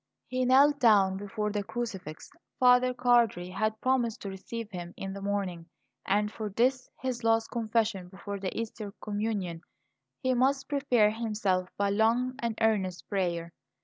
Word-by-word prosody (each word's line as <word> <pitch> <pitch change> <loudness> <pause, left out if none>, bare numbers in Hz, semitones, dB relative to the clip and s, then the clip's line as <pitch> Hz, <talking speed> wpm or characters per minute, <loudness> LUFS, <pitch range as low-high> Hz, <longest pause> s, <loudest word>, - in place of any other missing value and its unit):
He 255 0 -1
knelt 280 +3 +5
down 200 -6 +5
before 210 +1 -3
the 205 0 -2
crucifix. 195 -9 -6 0.3
Father 250 0 +5
Cardi 240 -8 +2
had 215 +3 -1
promised 250 -4 0
to 200 - -4
receive 215 +3 -7
him 175 -2 -7
in 195 0 -5
the 200 - -7
morning; 195 -4 -2 0.4
and 210 +2 +2
for 215 -2 -4
this, 255 +5 +1
his 250 -2 -2
last 225 0 +2
confession 220 -5 0
before 200 +2 -7
the 190 +2 -3
Easter 220 -2 -6
communion, 205 -5 -3 0.6
he 260 0 +2
must 270 +2 +2
prepare 255 -7 +3
himself 210 -5 -1
by 200 0 +1
long 230 +5 +2
and 230 -2 -2
earnest 195 -5 +1
prayer. 170 -4 -1
215 Hz, 150 wpm, -29 LUFS, 195-240 Hz, 0.6 s, knelt